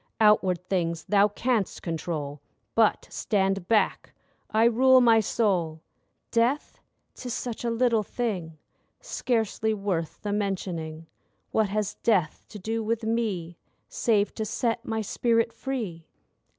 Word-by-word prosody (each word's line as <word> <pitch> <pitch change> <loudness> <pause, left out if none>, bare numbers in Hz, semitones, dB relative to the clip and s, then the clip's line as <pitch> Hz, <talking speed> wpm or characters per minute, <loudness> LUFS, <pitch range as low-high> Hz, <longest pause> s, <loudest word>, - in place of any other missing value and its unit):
Outward 190 -4 +3
things 170 -3 -1
thou 205 0 +4
canst 220 0 -1
control; 155 -4 -4 0.3
But 225 -2 +3
stand 195 -3 0
back—I 220 +1 -1
rule 255 +3 +6
my 230 -2 +6
soul! 180 -8 0 0.5
Death? 245 +6 +1 0.3
'Tis 245 -1 -5
such 240 -2 -4
a 235 - 0
little 230 -1 +2
thing— 190 -8 -3 0.4
Scarcely 220 - -1
worth 190 -6 -2
the 205 -1 -1
mentioning. 175 -6 -3 0.5
What 220 -2 +2
has 210 0 -2
death 185 -9 +1
to 210 - -9
do 225 +3 -2
with 225 +1 -1
me, 210 -7 -2 0.3
Save 210 -3 +1
to 220 - -3
set 230 +2 -1
my 220 0 -2
spirit 230 +2 +1
free? 215 - -5
210 Hz, 125 wpm, -27 LUFS, 180-230 Hz, 0.5 s, rule